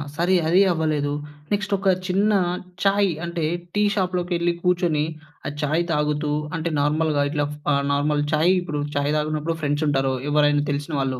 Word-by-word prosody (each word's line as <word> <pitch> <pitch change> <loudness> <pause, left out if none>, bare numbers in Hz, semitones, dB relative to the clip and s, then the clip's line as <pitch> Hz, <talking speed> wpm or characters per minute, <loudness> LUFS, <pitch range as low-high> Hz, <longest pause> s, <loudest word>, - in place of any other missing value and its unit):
సరీ. 175 +4 +2
అదీ 180 +4 +5
అవ్వలేదు. 155 -3 0 0.4
నెక్స్ట్ 205 0 0
ఒక 195 +1 -3 0.2
చిన్న 200 +3 +2 0.5
చాయ్ 200 0 +3 0.2
అంటే, 170 -2 -2 0.3
టీ 210 - +2
షాప్‌లోకెళ్ళి 180 -2 0
కూర్చుని, 175 -4 +2 0.4
ఆ - - -1
చాయ్ 155 +3 +1
తాగుతూ 150 -1 0 0.3
అంటే, 165 +1 -2
నార్మల్‌గా 150 0 +1
ఇట్లా 145 0 0
ఫ్ - - -10 0.4
నార్మల్ 145 +1 +1
చాయి 160 +4 +4
ఇప్పుడు 150 -4 -3
చాయ్ 145 +1 +1
తాగినప్పుడు 155 +2 -1
ఫ్రెండ్సుంటారు, 145 -2 +1 0.2
ఎవ్వరైనా 145 0 +3
తెలిసిన 145 +3 -3
వాళ్ళు. 130 -2 -1
155 Hz, 145 wpm, -23 LUFS, 145-175 Hz, 0.5 s, అదీ